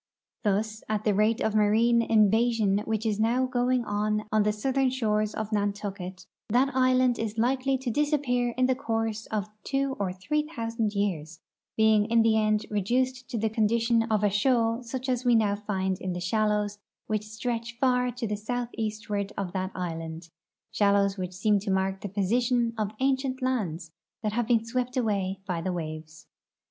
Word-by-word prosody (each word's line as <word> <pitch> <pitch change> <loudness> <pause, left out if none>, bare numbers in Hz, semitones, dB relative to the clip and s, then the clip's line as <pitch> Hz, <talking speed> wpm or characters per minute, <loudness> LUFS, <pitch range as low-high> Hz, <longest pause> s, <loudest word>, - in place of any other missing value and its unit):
Thus, 215 +1 0
at 215 -1 -1
the 210 - +2
rate 215 +3 +2
of 220 - +1
marine 220 +3 +4
invasion 220 -1 +3
which 220 0 -2
is 215 -2 0
now 240 +4 +2
going 250 -1 +1
on 210 +1 -1
on 215 0 +3
the 210 +1 +2
southern 265 +5 +1
shores 215 -4 0
of 220 0 -4
Nantucket, 200 -3 -3 0.2
that 255 +5 +2
island 255 -1 +3
is 225 0 -3
likely 260 +3 +1
to 255 -2 -3
disappear 250 -4 +1
in 255 - +3
the 260 - +3
course 225 -4 -2
of 210 -2 -3
two 275 -1 -1
or 195 -2 -1
three 300 +12 -2
thousand 225 -2 -2
years, 170 -5 -2 0.4
being 220 -1 +4
in 230 0 +3
the 225 -1 +3
end 215 -1 +2
reduced 250 +5 0
to 240 - -3
the 220 +1 +1
condition 230 +2 +2
of 220 -2 0
a 205 - +4
shoal 230 +2 +2
such 250 +2 -5
as 250 -1 0
we 245 -2 +4
now 210 -3 +3
find 190 -2 -2
in 185 -1 -2
the 175 - -4
shallows 210 +2 0 0.3
which 215 -1 -1
stretch 230 +1 -4
far 250 -1 +2
to 245 -1 -4
the 210 -1 -1
southeastward 215 -3 -3
of 190 -3 -3
that 185 -1 -2
island, 165 -2 -5 0.4
shallows 200 -1 +3
which 185 -2 -5
seem 205 +2 +2
to 200 +1 -5
mark 190 0 0
the 205 - -5
position 235 +4 +1
of 215 -2 -1
ancient 265 -1 +1
lands 180 -11 -2 0.3
that 210 -1 -1
have 235 0 0
been 230 -2 +2
swept 250 +2 -2
away 200 -5 0
by 180 -3 -2
the 185 - -2
waves. 155 -2 -6
220 Hz, 175 wpm, -27 LUFS, 200-245 Hz, 0.4 s, marine